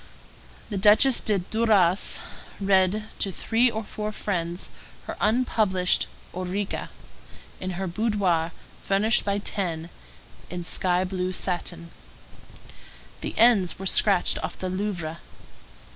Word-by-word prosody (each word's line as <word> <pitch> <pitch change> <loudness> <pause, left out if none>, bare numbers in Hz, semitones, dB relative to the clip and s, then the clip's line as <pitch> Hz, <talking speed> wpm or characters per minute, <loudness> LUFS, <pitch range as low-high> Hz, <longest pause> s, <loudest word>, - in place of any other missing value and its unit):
The 200 - -2
Duchesse 220 +6 +6
de 210 -2 +1
Duras 195 -2 +2 0.4
read 195 +1 +2 0.2
to 195 - 0
three 235 +6 +2
or 220 -1 -4
four 210 +1 -5
friends 175 -4 -3 0.3
her - - -5
unpublished 210 -5 +2 0.3
Ourika, 185 +2 -3 0.7
in 185 - -4
her 190 - -2
boudoir 185 -4 0 0.3
furnished 210 +3 +2
by 200 -1 0
X. 175 -5 -3 0.6
in 175 -1 -5
sky 180 +1 +2
blue 185 0 -3
satin. 175 -2 -3 1.3
The - - -5
N's 220 -7 +4
were 195 - -7
scratched 195 -1 +3
off - - -5
the 185 - -4
Louvre. 180 -4 -3
195 Hz, 115 wpm, -25 LUFS, 180-210 Hz, 1.3 s, Duchesse